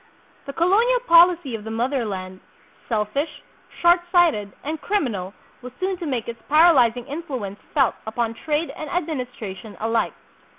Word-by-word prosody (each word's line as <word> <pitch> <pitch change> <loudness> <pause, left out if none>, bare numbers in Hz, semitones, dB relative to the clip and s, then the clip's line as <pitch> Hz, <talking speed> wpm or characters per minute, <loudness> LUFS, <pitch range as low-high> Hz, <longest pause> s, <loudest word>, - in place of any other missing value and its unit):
The 275 - -5
colonial 435 - +3
policy 340 - +5
of 220 -2 -5
the 220 - -7
mother 245 +3 -1
land, 185 -2 -6 0.5
selfish, 225 +7 -2 0.4
short 345 +1 +6
sighted, 320 - +3
and 310 +2 -4
criminal, 225 - -2 0.3
was 250 0 -9
soon 375 +1 -1
to 345 -2 -5
make 250 -6 -2
its 235 -1 -7
paralyzing 265 -7 +5
influence 265 - -5 0.2
felt 270 -5 +4
upon 230 +1 -1
trade 300 +7 -2
and 310 - -6
administration 250 - -5
alike. 225 +1 0
265 Hz, 140 wpm, -23 LUFS, 225-335 Hz, 0.5 s, short